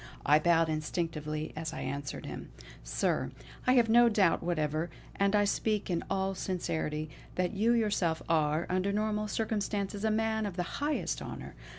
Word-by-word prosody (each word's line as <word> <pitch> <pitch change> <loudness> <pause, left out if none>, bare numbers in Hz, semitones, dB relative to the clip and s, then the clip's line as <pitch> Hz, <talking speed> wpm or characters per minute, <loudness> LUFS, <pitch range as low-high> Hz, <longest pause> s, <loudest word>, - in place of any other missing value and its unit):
I 150 +2 +6
bowed 165 0 +4
instinctively 155 -1 -2
as 160 +1 -4
I - - -5
answered 140 +1 -4
him: - - -7 0.3
"Sir, - - 0 0.4
I 255 - +6
have 240 -3 +5
no 235 +1 +6
doubt 200 -6 +3
whatever, 155 -1 -1 0.3
and 200 +1 +2
I 205 0 +4
speak 210 -1 0
in 170 - 0
all 195 0 0
sincerity, 160 -5 -2 0.3
that 180 +2 0
you 215 +4 +3
yourself 205 -8 +1
are, 155 0 +2
under 185 +2 +1
normal 210 +1 0
circumstances, 205 -1 -2
a 220 - +3
man 220 0 +1
of 190 - -6
the 180 -2 -3
highest 295 +1 0
honour. - - -7
185 Hz, 165 wpm, -31 LUFS, 160-210 Hz, 0.4 s, I